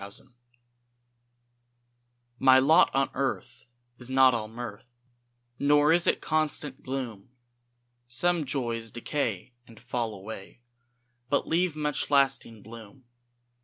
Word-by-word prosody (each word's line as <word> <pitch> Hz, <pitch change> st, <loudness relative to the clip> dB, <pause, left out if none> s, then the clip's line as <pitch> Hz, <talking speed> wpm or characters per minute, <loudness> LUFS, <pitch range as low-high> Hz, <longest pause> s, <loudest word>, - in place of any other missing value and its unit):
MY 100 Hz, -, -6 dB
LOT 120 Hz, +5 st, -9 dB, 2.0 s
My 130 Hz, -1 st, +6 dB
lot 155 Hz, +6 st, +5 dB
on 135 Hz, 0 st, +1 dB
earth 135 Hz, -2 st, -4 dB, 0.3 s
is 120 Hz, 0 st, -5 dB
not 130 Hz, -1 st, +5 dB
all 110 Hz, -2 st, -2 dB
mirth, 115 Hz, 0 st, -8 dB, 0.7 s
Nor 145 Hz, +2 st, +4 dB
is 170 Hz, 0 st, +3 dB
it -, -, +2 dB
constant 150 Hz, -3 st, -2 dB
gloom; 125 Hz, -7 st, -5 dB, 0.8 s
Some 160 Hz, +6 st, +1 dB
joys 120 Hz, -4 st, -2 dB
decay 120 Hz, -2 st, -3 dB
and 115 Hz, -2 st, -15 dB
fall 120 Hz, -3 st, -3 dB
away, 100 Hz, +3 st, -10 dB, 0.7 s
But 140 Hz, -, +1 dB
leave 170 Hz, 0 st, +1 dB
much 150 Hz, -2 st, -2 dB
lasting 135 Hz, -6 st, +1 dB
bloom. 115 Hz, +3 st, -13 dB
130 Hz, 115 wpm, -27 LUFS, 115-145 Hz, 2.0 s, My